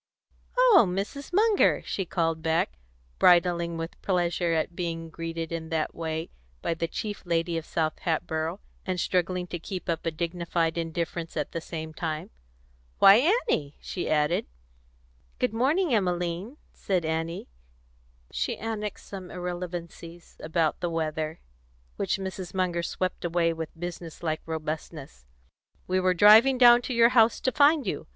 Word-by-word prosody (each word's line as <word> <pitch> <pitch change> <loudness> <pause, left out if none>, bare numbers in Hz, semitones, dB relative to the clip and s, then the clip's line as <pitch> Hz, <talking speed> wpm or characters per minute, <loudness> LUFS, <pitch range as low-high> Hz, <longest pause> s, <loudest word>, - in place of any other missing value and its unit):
"Oh, - - +7
Mrs. 200 - -4
Munger!" 420 +3 +3
she 195 - -2
called 165 -2 -1
back, 160 - 0 0.4
bridling 170 -1 +4
with 165 +1 -6
pleasure 175 -2 0
at 165 +1 -1
being 165 -2 -4
greeted 165 0 -5
in 165 -1 -4
that 160 -1 -1
way 160 0 -4 0.3
by - - 0
the 165 0 -2
chief 210 +4 -5
lady 170 0 0
of 165 -1 -4
South 155 -2 -1
Hatboro', 165 +1 -2 0.2
and 185 -1 -2
struggling 180 +1 0
to 175 -1 -6
keep 185 +2 -6
up 165 -1 -1
a 165 - 0
dignified 170 0 -1
indifference 170 0 -3
at 150 - -2
the 165 - -4
same 160 -1 -6
time. 155 -1 -4 0.7
"Why, 225 - +7 0.2
Annie!" 145 - -1
she 180 - -4
added. 150 +2 +1 0.9
"Good - - 0
morning, 285 +7 +2
Emmeline," 180 - -1 0.2
said 185 -4 -1
Annie; 165 +2 -3 0.8
she - - -2
annexed 210 -2 -5
some 190 -3 -8
irrelevancies 175 -1 -7
about 160 0 0
the 175 - -1
weather, 160 -1 -3 0.6
which - - 0
Mrs. 190 -1 -6
Munger 180 -2 0
swept 185 +2 -3
away 170 -1 +1
with 160 0 -7
business 175 -1 -7
like 155 -1 -1
robustness. 155 - -6 0.6
"We 185 +1 +1
were 185 0 +2
driving 220 +8 +7
down 240 -1 +8
to - - -1
your 230 0 +6
house 235 -2 +4
to 260 - +1
find 290 0 +4
you. 170 -7 -3
170 Hz, 145 wpm, -27 LUFS, 165-190 Hz, 0.9 s, down